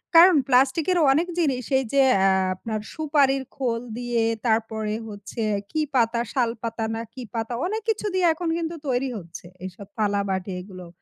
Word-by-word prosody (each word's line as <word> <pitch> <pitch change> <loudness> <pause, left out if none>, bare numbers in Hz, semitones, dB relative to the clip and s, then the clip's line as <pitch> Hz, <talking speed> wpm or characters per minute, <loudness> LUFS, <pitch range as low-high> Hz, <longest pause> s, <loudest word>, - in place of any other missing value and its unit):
কারণ 345 +1 +9
প্লাস্টিকের 275 +7 +3
অনেক 320 +6 +2
জিনিস 265 -6 +1 0.2
এই 265 - -2
যে, 275 - +5 0.2
অ্যা 190 0 +4 0.2
আপনার 215 +3 -4
সুপারির 285 -3 +2
খোল 235 -3 -1 0.2
দিয়ে, 240 -2 0 0.2
তারপরে 220 -1 0 0.2
হচ্ছে 205 +2 -7 0.3
কি 310 0 0
পাতা? 235 -1 +3
শাল 240 -4 +2
পাতা 225 -1 -2
না, 225 - -3
কি 255 - -8
পাতা? 225 +1 -2
অনেক 435 +4 -2
কিছু 430 -1 0
দিয়ে 370 -1 +2
এখন 330 +1 -3
কিন্তু 335 0 -3
তৈরি 260 +1 0
হচ্ছে। 170 -1 -10 0.2
এইসব 190 +1 -8
থালাবাটি 200 -2 0
এগুলো। 185 -3 -10
240 Hz, 165 wpm, -24 LUFS, 215-290 Hz, 0.3 s, কারণ